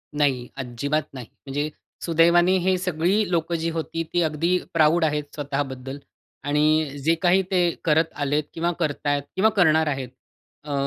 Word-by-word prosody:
नाही. 135 -4 +1
अजिबात 140 +4 -2
नाही. 125 -4 -8 0.2
म्हणजे 145 +2 -2 0.4
सुदैवाने 170 +2 +4
हे 185 0 +3
सगळी 180 +3 0
लोकं 170 0 0
जी 165 0 -1
होती 165 +1 -3
ती 175 - +2
अगदी 165 +3 +1 0.2
प्राउड 160 +1 +4
आहेत 150 -1 0
स्वतः 145 -1 -2
बद्दल. 130 +2 -7 0.4
आणि 150 +1 +2 0.2
जे 165 +1 +4
काही 185 +1 +4
ते 180 -2 +3
करत 160 +1 +2
आलेत 145 +2 0
किंवा 170 +1 -1
करतायत 145 -3 -1
किंवा 210 +4 +4
करणार 160 -4 +4
आहेत. 135 -4 -3 0.5
अ, 145 -1 -5
155 Hz, 155 wpm, -23 LUFS, 145-170 Hz, 0.5 s, सुदैवाने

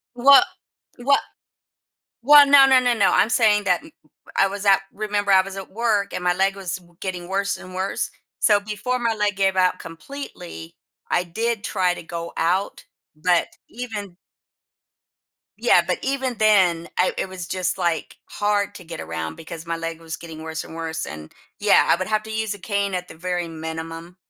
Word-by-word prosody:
What 275 +3 +7 0.5
what 280 +3 +3 1.0
well, 290 +2 +8
no, 275 -1 +8
no, 260 -1 +6
no, 245 -1 +2
no, 205 -4 +3
I'm 220 - +3
saying 210 -4 +3
that 180 -2 +2 0.6
I 195 - +5
was 200 +1 -6
at 195 0 +6
remember 205 -1 -1
I 190 - +7
was 195 0 -8
at 195 -1 -8
work 215 -2 0
and 180 - -3
my 180 0 +2
leg 195 +1 +1
was 190 -3 -4
w 175 -2 -19
getting 180 -2 -5
worse 200 +1 -1
and 185 0 -11
worse. 190 +1 -2 0.3
So 205 -2 +4
before 215 +5 -3
my 230 -2 0
leg 210 -2 0
gave 195 -1 +1
out 185 -1 +2
completely, 165 - -9 0.4
I 175 - +2
did 225 +5 -2
try 185 -3 +1
to - - -9
go 170 0 -6
out. 180 +4 0 0.3
But 175 +2 +2 0.2
even 215 -6 -6 1.4
Yeah, - - +5
but - - -1
even 265 -2 -1
then, 185 -6 +3
I 185 - +3
it - - -2
was 185 -2 -7
just, 185 -1 -2
like, 170 -3 -1
hard 205 -1 -1
to 180 - -11
get 165 0 -7
around 80 0 -5
because 165 0 -9
my 165 0 -2
leg 165 0 -5
was 165 -1 -6
getting 160 -2 -10
worse 160 0 -5
and - - -11
worse, 160 -1 -4
and, 75 0 -9 0.3
yeah, - - +4
I - - +5
would 185 +1 -4
have 215 0 +1
to 220 - -9
use 220 -1 -2
a - - -11
cane 200 -1 -1
at 180 0 -4
the - - -11
very 175 0 -3
minimum, 165 +2 -7
190 Hz, 190 wpm, -22 LUFS, 170-210 Hz, 1.4 s, well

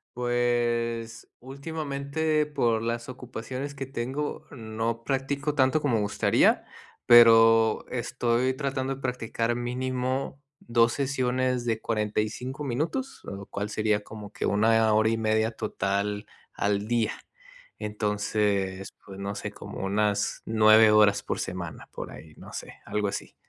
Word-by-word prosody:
Pues, 120 -1 -1
últimamente 150 +2 -2
por 120 -6 +1
las 115 +1 -3
ocupaciones 130 +3 -6
que 135 0 -4
tengo 135 +3 -4
no 115 -1 -3
practico 140 +2 -1
tanto 140 +2 +3
como 130 -6 +1
me 105 - +1
gustaría, 100 0 +2 0.4
pero, 115 -1 +7
estoy 125 +1 0
tratando 135 -1 -2
de 135 - -14
practicar 115 -1 -1
mínimo, 130 +2 -2 0.2
2 115 0 +3
sesiones 130 -2 0
de 115 -1 0
45 110 +6 -2
minutos, 160 - -3
lo 100 0 -7
cual 105 +1 -4
sería 105 -1 0
como 105 -1 -10
que - - -3
1 110 +1 +3
hora 110 +1 +4
y 115 - 0
media 110 0 +1
total 105 -1 -2 0.3
al 100 +1 0
día. 115 -2 +1 0.7
Entonces 105 -2 -1 0.2
pues, 95 -1 -10
no 100 +1 -4
sé, - - -5
como - - -9
unas 105 +1 0
9 110 0 +6
horas 105 -1 +5
por - - -3
semana 85 -4 -5
por - - -6
ahí, 80 -1 -12
no - - -12
sé, - - -7
algo 105 -1 -1
así. - - -5
115 Hz, 135 wpm, -27 LUFS, 105-130 Hz, 0.7 s, pero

